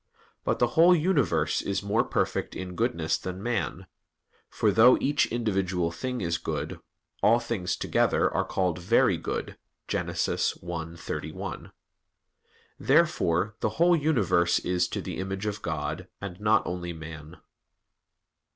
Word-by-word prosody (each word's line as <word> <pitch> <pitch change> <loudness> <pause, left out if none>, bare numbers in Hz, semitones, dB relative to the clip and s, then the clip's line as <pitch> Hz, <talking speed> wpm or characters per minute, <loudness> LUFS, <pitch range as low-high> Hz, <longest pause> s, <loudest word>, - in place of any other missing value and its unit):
But - - 0
the 120 - +2
whole 175 +2 +7
universe 145 - +1
is 100 0 -2
more 100 +2 +2
perfect - - -1
in 90 -1 -5
goodness 90 -8 0
than 90 +1 -6
man; 110 -6 -2 0.6
for 105 - +1
though 115 +5 +7
each 145 +1 +2
individual 95 -7 -1
thing 125 +8 -4
is 85 -2 -1
good, - - -4 0.4
all 115 +2 +5
things 115 -7 -2
together - - +2
are - - +1
called 90 -2 -1
"very 90 - +3
good" - - -5 0.3
(Gen. - - -1
1:31). 85 -1 -3 1.1
Therefore 85 +6 +2
the - - 0
whole 175 +1 +5
universe 115 - +2
is 90 0 0
to - - -4
the - - -5
image 95 +2 -4
of 105 0 -3
God, 80 +2 -3
and 100 -2 -7
not 105 +1 +3
only 85 -1 -4
man. 80 -1 -9
95 Hz, 135 wpm, -27 LUFS, 85-115 Hz, 1.1 s, whole